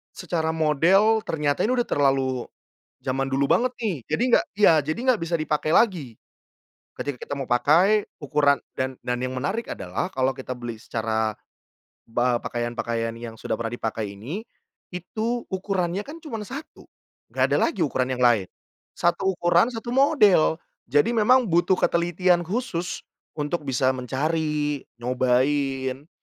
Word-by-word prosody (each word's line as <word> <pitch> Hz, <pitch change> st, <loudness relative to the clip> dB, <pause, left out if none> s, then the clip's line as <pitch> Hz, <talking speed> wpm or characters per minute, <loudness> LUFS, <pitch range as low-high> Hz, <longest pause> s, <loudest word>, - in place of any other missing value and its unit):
secara 160 Hz, -2 st, -2 dB
model 185 Hz, +8 st, +3 dB
ternyata 150 Hz, +2 st, 0 dB
ini 250 Hz, -, +1 dB
udah 245 Hz, -1 st, 0 dB
terlalu 135 Hz, -3 st, +1 dB, 0.6 s
jaman 135 Hz, +1 st, -1 dB
dulu 135 Hz, +1 st, +1 dB
banget 245 Hz, -, +2 dB
nih, 215 Hz, -8 st, -2 dB
jadi -, -, 0 dB, 0.2 s
gak -, -, -5 dB
ya 205 Hz, -6 st, +6 dB
jadi 155 Hz, +6 st, -3 dB
gak 220 Hz, -, -3 dB
bisa 165 Hz, 0 st, 0 dB
dipakai 155 Hz, 0 st, 0 dB
lagi, 165 Hz, -, +1 dB, 0.8 s
ketika 140 Hz, -4 st, -4 dB
kita 145 Hz, -, -3 dB
mau 140 Hz, -, -3 dB
pakai 160 Hz, -, +3 dB, 0.2 s
ukuran 145 Hz, 0 st, +3 dB, 0.2 s
dan 130 Hz, 0 st, -3 dB
dan 125 Hz, 0 st, -2 dB
yang 130 Hz, +1 st, -3 dB
menarik 195 Hz, -, -2 dB
adalah -, -, -3 dB
kalau 130 Hz, 0 st, +2 dB
kita 130 Hz, -1 st, -6 dB
beli 120 Hz, -2 st, -7 dB
secara 110 Hz, -1 st, -2 dB, 0.7 s
pa 120 Hz, +1 st, +1 dB
pakaian-pakaian 115 Hz, -1 st, -3 dB
yang 115 Hz, -1 st, -7 dB
sudah -, -, -5 dB
pernah 115 Hz, +1 st, -3 dB
dipakai 110 Hz, -3 st, -4 dB
ini, 140 Hz, -, -5 dB, 0.5 s
itu 220 Hz, +7 st, -3 dB
ukurannya 190 Hz, -1 st, -1 dB
kan 290 Hz, +9 st, -8 dB
cuman 225 Hz, -7 st, -5 dB
1, 275 Hz, +5 st, -9 dB, 0.4 s
gak -, -, 0 dB
ada -, -, +3 dB
lagi 330 Hz, -, -1 dB
ukuran 130 Hz, -2 st, -1 dB
yang 125 Hz, -, +1 dB
lain. 110 Hz, -6 st, +3 dB, 0.5 s
1 190 Hz, +2 st, +1 dB
ukuran, 175 Hz, +5 st, +3 dB
1 240 Hz, 0 st, -5 dB
model, 210 Hz, -, +4 dB, 0.3 s
jadi 145 Hz, -, +3 dB
memang 245 Hz, +3 st, +4 dB
butuh 175 Hz, -1 st, +2 dB
ketelitian 175 Hz, +1 st, +2 dB
khusus 180 Hz, -2 st, -3 dB, 0.3 s
untuk 150 Hz, +3 st, -2 dB
bisa 130 Hz, 0 st, +2 dB
mencari, 150 Hz, +2 st, -1 dB, 0.2 s
nyobain, 130 Hz, +3 st, 0 dB
150 Hz, 145 wpm, -24 LUFS, 130-190 Hz, 0.8 s, ya